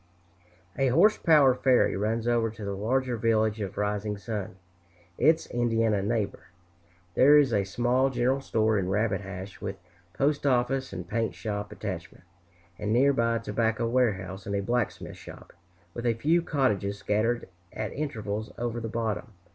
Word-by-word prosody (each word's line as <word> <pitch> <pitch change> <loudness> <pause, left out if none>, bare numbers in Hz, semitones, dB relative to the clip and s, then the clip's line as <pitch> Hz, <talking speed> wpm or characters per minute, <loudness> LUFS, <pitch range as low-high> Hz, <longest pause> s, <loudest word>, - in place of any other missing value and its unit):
A 135 - +3
horse 180 - +4
power 150 -6 +5
ferry 130 0 +3
runs 110 +3 -1
over 120 -1 +2
to 110 -1 -8
the 100 - -3
larger 120 +5 -1
village 110 -1 +1
of 100 -3 -5
Rising 105 0 -1
Sun, 100 -1 -5 0.6
its 160 +5 +4
Indiana 115 -3 +1
neighbor. 105 0 -2 0.7
There 145 +8 +6
is 140 -5 +4
a 100 -2 +2
small 125 +6 +1
general 130 +2 0
store 110 -4 +1
in 90 -1 -2
Rabbit 100 0 0
Hash, 95 0 -8
with 95 - -4 0.4
postoffice 135 -2 +1
and - - -6
paint 115 -1 -1
shop 105 -2 -4
attachment, - - -7 0.6
and 105 0 -2
near 135 +5 +4
by 115 -2 +1
a - - 0
tobacco 115 0 0
warehouse 100 -6 -1
and 100 - -2
a 100 - -1
blacksmith 120 +1 -2
shop, - - -12 0.4
with 120 +4 -3
a 115 - +2
few 160 +9 +2
cottages 105 - 0
scattered 110 +4 0 0.2
at 110 - -4
intervals 110 -7 -4
over 120 0 -2
the 115 -1 -5
bottom. 115 0 -3
115 Hz, 155 wpm, -27 LUFS, 105-125 Hz, 0.7 s, There